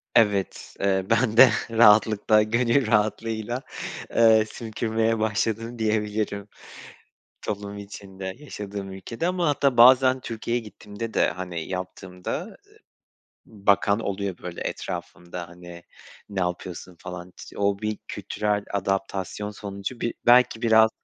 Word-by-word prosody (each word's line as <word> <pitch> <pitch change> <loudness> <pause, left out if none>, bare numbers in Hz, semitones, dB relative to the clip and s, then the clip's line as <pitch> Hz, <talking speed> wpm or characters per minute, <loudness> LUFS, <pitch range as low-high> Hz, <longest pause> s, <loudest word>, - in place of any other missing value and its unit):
Evet, 100 -4 +1
eee, 95 -1 +1
ben 115 0 +2
de 130 -1 +10 0.2
rahatlıkla, 110 -1 +5
gönül 115 +3 +2
rahatlığıyla 110 +2 0 0.5
eee, 110 -1 +6
sümkürmeye 115 0 -1
başladım 110 +2 -1
diyebilirim 105 -2 -1 1.0
toplum 100 0 -5
içinde, 95 -2 -8
yaşadığım 100 -8 -7
ülkede. 115 - -4
Ama 180 -2 +1
hatta 140 -3 +2
bazen 130 +2 +7
Türkiye'ye 115 0 -3
gittiğimde 105 +1 -8
de, - - +3
hani, 90 -1 -5
yaptığımda, 90 0 -5
eee, - - -26 0.7
bakan 100 0 +2
oluyor, 100 -3 -3
böyle, 90 -1 -8
etrafımda, 90 0 -6
hani, 85 0 -12 0.5
"Ne 100 -2 -3
yapıyorsun?" 90 0 -4
falan. 90 0 -8
T - - -11
o 100 -1 +1
bir 105 0 -2
kültürel 105 -1 -2
adaptasyon 95 +1 -2
sonucu 100 +3 -6
bir 115 - -1
belki 120 -1 +5
biraz, 110 -1 +5
105 Hz, 115 wpm, -25 LUFS, 95-115 Hz, 1.0 s, de